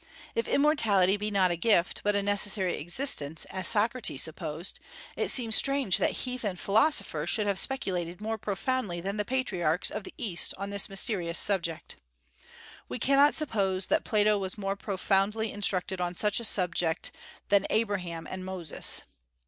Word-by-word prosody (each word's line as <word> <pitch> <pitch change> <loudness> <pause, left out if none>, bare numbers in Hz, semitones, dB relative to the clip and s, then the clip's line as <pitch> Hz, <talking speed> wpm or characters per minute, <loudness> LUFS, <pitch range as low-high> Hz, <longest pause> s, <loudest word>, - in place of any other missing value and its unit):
If 230 - -2
immortality 215 - +2
be 210 +1 -4
not 190 -3 +1
a - - -1
gift, 175 -1 +1
but 205 0 0
a 200 - 0
necessary 200 -2 +3
existence, 165 - -1
as 185 -2 -1
Socrates 225 - +2
supposed, 160 +2 -4 0.4
it - - -1
seems 230 -4 +5
strange 275 -8 +3
that - - -1
heathen 250 -7 -4
philosophers 200 - 0
should 215 - +1
have 200 -2 +2
speculated 180 -10 +1
more 220 +1 -4
profoundly 205 -2 -3
than 195 +4 -5
the 210 - -1
patriarchs 190 -10 -1
of - - -5
the - - -12
East 180 -6 +1
on 200 +1 -6
this 200 0 +3
mysterious 195 -4 +1
subject. 170 -4 0 0.9
We 125 - -5
cannot 280 +2 +3
suppose 195 -10 0
that - - +1
Plato 210 -1 +1
was 190 +2 -5
more 195 -1 -3
profoundly 200 +2 -1
instructed 190 -2 -1
on 175 0 -3
such 210 +4 +1
a 235 - +1
subject 175 -4 0 0.4
than 200 -1 +2
Abraham 185 -7 -2
and 185 0 -7
Moses. 185 -5 -1
200 Hz, 155 wpm, -28 LUFS, 180-220 Hz, 0.9 s, seems